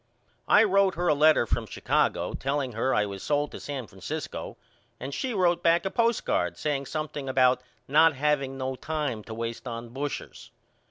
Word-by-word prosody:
I 215 Hz, -, +7 dB
wrote 195 Hz, -2 st, +3 dB
her 175 Hz, +1 st, -1 dB
a -, -, +5 dB
letter 150 Hz, -3 st, +5 dB
from -, -, -1 dB
Chicago -, -, 0 dB
telling 135 Hz, -1 st, -2 dB
her 115 Hz, +4 st, 0 dB
I 105 Hz, -, +2 dB
was 100 Hz, -1 st, -7 dB
sold 145 Hz, 0 st, 0 dB
to -, -, -8 dB
San 140 Hz, -4 st, -5 dB
Francisco 95 Hz, -, -6 dB, 0.4 s
and 135 Hz, +2 st, -6 dB
she 260 Hz, -, -2 dB
wrote 180 Hz, -5 st, +2 dB
back 170 Hz, +2 st, +3 dB
a 190 Hz, -, -1 dB
postcard 235 Hz, -1 st, +1 dB
saying 140 Hz, -3 st, -2 dB
something 150 Hz, -3 st, -4 dB
about 130 Hz, -1 st, +3 dB, 0.3 s
not 155 Hz, +2 st, +5 dB
haveing 135 Hz, -1 st, 0 dB
no 130 Hz, 0 st, -3 dB
time 145 Hz, -6 st, -3 dB
to 110 Hz, -, -7 dB
waste 115 Hz, +2 st, -5 dB
on 115 Hz, 0 st, -6 dB
bushers. 140 Hz, +4 st, -6 dB
140 Hz, 175 wpm, -27 LUFS, 130-160 Hz, 0.4 s, I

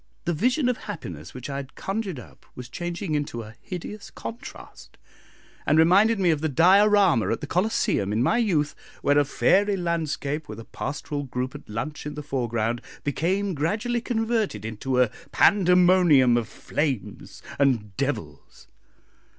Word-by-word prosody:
The 175 Hz, -, 0 dB
vision 250 Hz, -, +1 dB
of 250 Hz, -, +1 dB
happiness 90 Hz, -, -8 dB
which 125 Hz, -, -7 dB
I 140 Hz, -1 st, -4 dB
had 140 Hz, -1 st, -8 dB
conjured 195 Hz, -, -3 dB
up -, -, -15 dB
was 125 Hz, -1 st, -9 dB
changing 175 Hz, +2 st, -4 dB
into 145 Hz, -6 st, -2 dB
a 110 Hz, 0 st, -11 dB
hideous 200 Hz, +3 st, -7 dB
contrast, 245 Hz, +4 st, -10 dB, 0.7 s
and 155 Hz, -, +2 dB
reminded 195 Hz, +7 st, +5 dB
me 180 Hz, -3 st, +3 dB
of 150 Hz, -2 st, -1 dB
the 160 Hz, -, 0 dB
Diorama 190 Hz, -, +4 dB
at 115 Hz, -, -1 dB
the -, -, -5 dB
Colosseum 170 Hz, -, 0 dB
in 110 Hz, +3 st, +1 dB
my 230 Hz, -, +2 dB
youth, 160 Hz, -10 st, +1 dB, 0.3 s
where 145 Hz, +1 st, +4 dB
a -, -, +4 dB
fairy 200 Hz, +8 st, +2 dB
landscape, 160 Hz, -, -2 dB
with 110 Hz, 0 st, -7 dB
a 115 Hz, -, -9 dB
pastoral 145 Hz, +1 st, -4 dB
group 125 Hz, 0 st, -4 dB
at -, -, -11 dB
lunch 145 Hz, +8 st, -5 dB
in 150 Hz, -, -6 dB
the 150 Hz, -, -6 dB
foreground, 120 Hz, -4 st, -1 dB, 0.2 s
became 185 Hz, +7 st, 0 dB
gradually 210 Hz, -, -1 dB
converted 225 Hz, -, -1 dB
into 125 Hz, +4 st, -2 dB
a 125 Hz, -4 st, +3 dB, 0.2 s
pandemonium 180 Hz, -9 st, +5 dB
of 120 Hz, -2 st, 0 dB
flames 140 Hz, -9 st, -4 dB, 0.2 s
and 115 Hz, -8 st, +1 dB
devils. -, -, -5 dB
155 Hz, 155 wpm, -25 LUFS, 125-195 Hz, 0.7 s, reminded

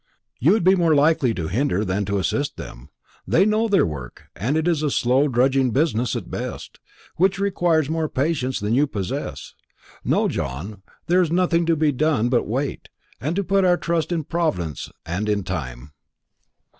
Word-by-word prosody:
"You 155 Hz, -, +4 dB
would 215 Hz, -, +1 dB
be 185 Hz, +2 st, +6 dB
more 170 Hz, -4 st, +3 dB
likely 145 Hz, -3 st, +3 dB
to 80 Hz, -3 st, -3 dB
hinder 110 Hz, -, 0 dB
than 100 Hz, +2 st, -1 dB
to 100 Hz, +1 st, -1 dB
assist 140 Hz, +9 st, -1 dB
them. 60 Hz, +4 st, -10 dB, 0.4 s
They 190 Hz, -, +4 dB
know 215 Hz, +2 st, +2 dB
their 200 Hz, -3 st, +3 dB
work, 65 Hz, -6 st, -8 dB
and 125 Hz, -, -1 dB
it 160 Hz, +1 st, 0 dB
is 165 Hz, -4 st, +1 dB
a 150 Hz, -, +1 dB
slow 130 Hz, +2 st, +2 dB
drudging 130 Hz, 0 st, +2 dB
business 125 Hz, -3 st, 0 dB
at -, -, -6 dB
best, -, -, -6 dB, 0.4 s
which 190 Hz, +2 st, +2 dB
requires 175 Hz, -6 st, +1 dB
more 160 Hz, 0 st, -1 dB
patience 130 Hz, -2 st, -1 dB
than 105 Hz, +2 st, -1 dB
you 145 Hz, +4 st, +3 dB
possess. 100 Hz, -8 st, -5 dB, 0.5 s
No, -, -, +2 dB
John, 95 Hz, +10 st, -5 dB, 0.2 s
there 180 Hz, +2 st, +3 dB
is 175 Hz, -, +1 dB
nothing 170 Hz, -1 st, +2 dB
to 165 Hz, -, +3 dB
be 155 Hz, -1 st, +2 dB
done 145 Hz, -4 st, +1 dB
but 125 Hz, -, +3 dB
to -, -, 0 dB
wait, 130 Hz, +6 st, -3 dB, 0.3 s
and 170 Hz, +8 st, -2 dB
put 195 Hz, 0 st, +3 dB
our 180 Hz, -1 st, +4 dB
trust 170 Hz, 0 st, -1 dB
in 165 Hz, -2 st, -1 dB
Providence 105 Hz, -, -2 dB, 0.2 s
and 90 Hz, +6 st, -2 dB
in 105 Hz, -2 st, 0 dB
time." 70 Hz, -7 st, -6 dB
140 Hz, 180 wpm, -22 LUFS, 105-170 Hz, 0.5 s, be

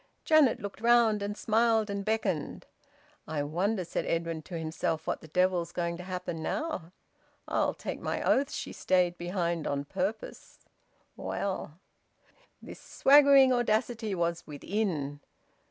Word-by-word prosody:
Janet 310 Hz, -6 st, +5 dB
looked 200 Hz, +1 st, -7 dB
round, 230 Hz, -3 st, +4 dB
and 205 Hz, +1 st, -3 dB
smiled 225 Hz, 0 st, +2 dB
and 200 Hz, -1 st, -3 dB
beckoned. 205 Hz, -8 st, -2 dB, 0.6 s
"I 150 Hz, -2 st, -2 dB
wonder," 185 Hz, +6 st, -1 dB
said -, -, -2 dB
Edwin 165 Hz, -1 st, -1 dB
to 170 Hz, +2 st, -7 dB
himself, 160 Hz, 0 st, -2 dB
"what -, -, -2 dB
the -, -, -12 dB
devil's 180 Hz, +1 st, +1 dB
going 170 Hz, -1 st, -2 dB
to 180 Hz, -, -8 dB
happen 180 Hz, -3 st, -5 dB
now? 185 Hz, -, -3 dB, 0.6 s
I'll -, -, 0 dB
take -, -, -5 dB
my -, -, -2 dB
oath 275 Hz, +1 st, +2 dB
she -, -, -5 dB
stayed 180 Hz, -2 st, +1 dB
behind 175 Hz, -2 st, -2 dB
on 140 Hz, 0 st, -2 dB
purpose! 200 Hz, +9 st, -4 dB, 0.6 s
Well 190 Hz, -5 st, -4 dB, 0.4 s
" -, -, -34 dB
This -, -, -10 dB
swaggering 275 Hz, -2 st, +6 dB
audacity 225 Hz, -2 st, 0 dB
was 170 Hz, -1 st, -2 dB
within. 150 Hz, -3 st, -3 dB
185 Hz, 140 wpm, -29 LUFS, 170-220 Hz, 0.6 s, swaggering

